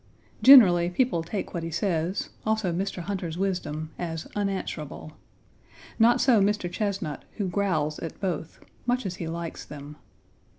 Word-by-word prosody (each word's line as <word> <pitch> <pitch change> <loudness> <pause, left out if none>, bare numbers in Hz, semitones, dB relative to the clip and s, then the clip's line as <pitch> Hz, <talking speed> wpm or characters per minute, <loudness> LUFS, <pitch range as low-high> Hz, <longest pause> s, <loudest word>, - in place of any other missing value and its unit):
Generally, 180 -11 +8
people 180 -1 +1
take 185 +5 -5
what 170 - -2
he 165 - -4
says, 170 +1 -1
also 215 -5 0
Mr. 185 0 -3
Hunter's 180 -4 -4
wisdom, 175 -5 -2
as 165 -2 -4
unanswerable. 190 -7 -4 0.9
Not 240 +2 +5
so 240 -6 +4
Mr. 200 -3 +1
Chesnut, 195 -8 -3 0.2
who 205 -3 -1
growls 170 -5 0
at 165 - -7
both, 170 -4 -4 0.3
much 245 -1 +1
as 180 -1 -4
he 165 - -4
likes 165 0 -5
them. 145 +1 -10
180 Hz, 140 wpm, -26 LUFS, 165-200 Hz, 0.9 s, Generally